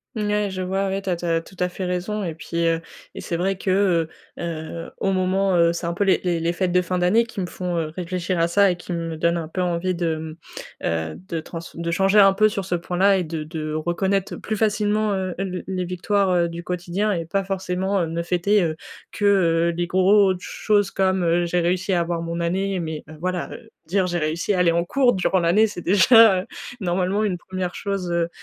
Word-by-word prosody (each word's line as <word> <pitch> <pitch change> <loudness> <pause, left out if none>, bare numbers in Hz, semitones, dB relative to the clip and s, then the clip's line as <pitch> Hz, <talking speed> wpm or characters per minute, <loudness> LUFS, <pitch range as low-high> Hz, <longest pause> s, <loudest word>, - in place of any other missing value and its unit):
N 215 -2 -1
ouais, 210 -1 +1
je 185 -1 -4
vois, 195 +2 -1
ouais, 195 +1 -2
tu 195 - -3
as - - +1
tu 175 - -6
as 165 -1 +2
tout 190 +3 -16
à 180 0 +1
fait 185 +1 -5
raison 185 +4 -2
et 165 -3 -3
puis, 170 +1 -3
heu 165 0 +1 0.3
et - - -7
c'est 170 - -3
vrai 190 +2 0
que, 185 -4 +2 0.3
heu - - -4
heu, 165 0 -5
au 195 - 0
moment, 190 0 +1
heu, 170 0 +4
c'est 170 0 -4
un 170 - -1
peu 200 - 0
les 195 -1 +3
les 175 -2 0
les 165 +1 0
fêtes 180 0 -1
de 180 0 +3
fin 180 +1 -2
d'année 195 +7 +3
qui 230 - -8
me 185 - -1
font, 175 0 -4
heu, 160 -2 -2
réfléchir 180 0 -2
à 165 - +3
ça, 200 +2 +4
et - - -2
qui 175 +1 -9
me 165 -2 -3
donnent 170 +1 +1
un 160 -2 -4
peu 185 +3 -3
envie 180 +1 0
de, 170 -2 -1
mmh, 155 0 -7 0.5
heu 80 -1 -2
,de 165 - -3
trans 165 +1 -7 0.2
de 170 0 -3
changer 195 +4 +3
un 195 -1 +7
peu 215 +2 +4
sur 195 -2 -4
ce 180 - -3
point-là 185 +3 +2
et 180 - 0
de 160 -1 -4
de 155 -1 -5
reconnaître 180 +5 -1
plus 215 -1 -4
facilement, 210 0 +1
heu, 185 -2 -2
l 185 -1 -4
les 185 -1 -2
victoires, 190 +2 0
heu, 170 -1 +2
du 170 +1 -7
quotidien 180 +4 -2
et 170 -3 -2
pas 195 +3 0
forcément 190 -1 -1
ne 170 +1 -3
fêter, 185 +3 +2
heu, 160 -2 -1 0.4
que, 205 - -2
heu, 170 -4 +3
les 175 - 0
grosses 190 +1 +4
choses 205 0 +1
comme, 190 -2 +1
heu, 170 +1 +2
j'ai 175 +1 0
réussi 185 +3 0
à 175 - +3
avoir 170 0 -2
mon 170 0 -4
année, 190 +3 -1
mais 160 -2 -4
heu, 155 - -11
voilà 180 0 -3 0.3
dire, 190 +4 +1
heu, - - -2
j'ai 175 0 -1
réussi 160 +6 -1
à - - 0
aller 170 -2 +4
en 170 +1 +1
cours 255 +3 +3
durant 190 0 +1
l'année, 175 +6 +4
c'est 180 -4 -7
déjà 200 +2 +6
heu, - - -10 0.3
normalement 185 +2 0
une 185 -4 0
1re 185 0 -5
chose, 195 -3 -3
heu 170 -1 0
180 Hz, 240 wpm, -23 LUFS, 170-195 Hz, 0.5 s, un